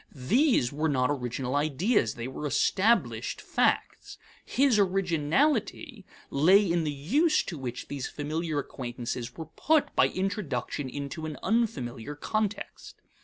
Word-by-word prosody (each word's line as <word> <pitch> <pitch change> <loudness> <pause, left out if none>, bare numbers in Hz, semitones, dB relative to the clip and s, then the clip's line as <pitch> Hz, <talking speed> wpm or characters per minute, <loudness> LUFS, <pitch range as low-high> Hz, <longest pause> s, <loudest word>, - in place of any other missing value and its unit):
These 185 - +2
were 155 +2 0
not 130 -1 +1
original 125 -1 -3
ideas; 150 - +1
they 120 +1 -5
were 140 +3 -4
established 210 - +1
facts. - - -1 0.3
His 265 -5 +2
originality 195 - 0 0.2
lay 185 +9 +5
in 170 -2 0
the 150 - 0
use 265 - +2
to 175 - -6
which 125 -2 -5
these 140 -2 -4
familiar 155 +1 -3
acquaintances 120 -3 -5
were 160 - -5
put 310 0 +2
by - - +5
introduction 150 - -3
into 145 +4 -5
an 155 -3 -6
unfamiliar 145 - -1
context. 210 +6 -4
155 Hz, 125 wpm, -28 LUFS, 135-205 Hz, 0.3 s, lay